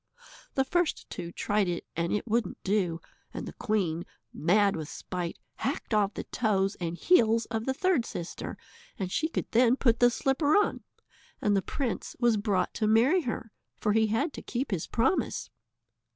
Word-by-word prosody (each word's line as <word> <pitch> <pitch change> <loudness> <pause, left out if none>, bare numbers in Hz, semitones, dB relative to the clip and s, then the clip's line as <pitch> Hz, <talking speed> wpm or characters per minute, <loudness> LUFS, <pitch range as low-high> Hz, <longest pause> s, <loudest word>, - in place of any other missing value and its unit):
The 265 - +2
first 350 +3 0
two 170 -2 -5
tried 205 +2 0
it 175 -1 -2
and 170 +1 -1
it 210 - -1
wouldn't 230 +1 0
do, 190 -5 +1 0.4
and - - -4
the - - -7
queen, 195 -8 -1 0.3
mad 200 +5 +3
with 155 -1 -5
spite, 175 -2 -5 0.2
hacked - - -3
off 205 -1 +2
the - - -3
toes 200 -4 +1
and 170 -1 -3
heels 230 - +4
of 225 +1 -2
the 265 - +2
third 340 -8 +2
sister, 170 - -6 0.4
and 185 -2 -3
she 315 - +1
could - - -3
then 240 +1 +5
put 235 -4 +2
the 245 - +7
slipper 275 +6 +2
on, 415 - +1 0.6
and 205 -1 +2
the 195 - +3
prince 255 +4 -3
was 240 -2 +4
brought 205 -3 0
to 215 - 0
marry 245 +12 +4
her, 230 -5 -4 0.3
for 210 - +1
he 220 0 +4
had 265 +9 0
to - - -7
keep 250 0 -3
his 180 -5 -1
promise. 235 +10 0
220 Hz, 180 wpm, -29 LUFS, 190-245 Hz, 0.6 s, the